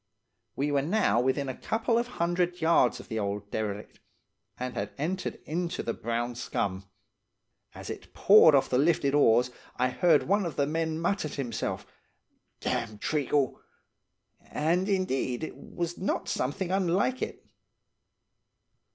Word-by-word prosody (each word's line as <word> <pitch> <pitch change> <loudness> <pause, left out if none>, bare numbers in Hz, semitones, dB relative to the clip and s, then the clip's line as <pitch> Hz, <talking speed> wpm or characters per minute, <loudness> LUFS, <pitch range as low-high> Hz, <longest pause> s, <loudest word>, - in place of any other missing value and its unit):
"We 145 +2 0
were 140 -1 +2
now 165 - +2
within 130 +2 0
a 130 - -4
couple 230 +1 0
of 240 - -2
hundred 175 +1 0
yards 160 -6 +3
of - - -11
the 110 - -3
old 100 0 -3
derelict, 105 -1 -4 0.6
and 125 0 -3
had 100 -3 -3
entered 175 +6 -2
into 170 +3 -2
the 115 - -2
brown 120 +1 -2
scum. 100 -5 -3 0.9
As - - -7
it - - -9
poured 195 -7 +7
off 135 - +3
the 125 - +1
lifted 145 -2 +2
oars 125 -3 +4 0.3
I 125 +1 +2
heard 160 +3 +3
one 200 +3 +2
of 170 -4 -4
the 140 - +2
men 160 +1 -1
mutter 170 -1 0
to - - -8
himself, 120 -6 -3 0.8
'Dam' 110 -2 -2
treacle!' 145 +1 0 0.9
And, 175 +6 0
indeed, 135 -9 0
it - - -5
was 175 0 -5
not 190 - -1
something 160 +8 -2
unlike 195 +7 +1
it. - - -5
150 Hz, 145 wpm, -28 LUFS, 125-175 Hz, 0.9 s, poured